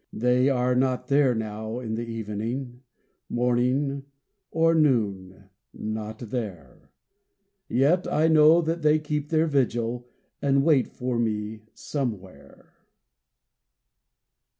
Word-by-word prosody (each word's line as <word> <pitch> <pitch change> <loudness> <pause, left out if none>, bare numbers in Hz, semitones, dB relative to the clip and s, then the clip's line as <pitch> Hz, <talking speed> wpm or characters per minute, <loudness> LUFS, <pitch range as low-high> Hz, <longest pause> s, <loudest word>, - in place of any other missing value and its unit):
They 125 +3 +2
are 125 -1 +1
not 130 0 0
there 140 -3 +3
now 110 +1 -4
in 115 -3 -5
the 115 +1 -3
evening 115 +3 -5 0.5
Morning 125 +3 0 0.5
or 165 0 +3
noon 100 - 0 0.3
not 110 0 -5
there; 105 - -7 0.8
Yet 150 +9 +2
I 155 +1 +3
know 160 +1 +6
that 165 +1 -2
they 155 0 +4
keep 150 -1 -3
their 160 0 +2
vigil, 120 -4 -1 0.3
And 140 -1 +2
wait 145 -5 +3
for 125 -1 -3
me 110 -1 -2 0.2
Somewhere. 95 - -6
125 Hz, 105 wpm, -25 LUFS, 110-145 Hz, 0.8 s, know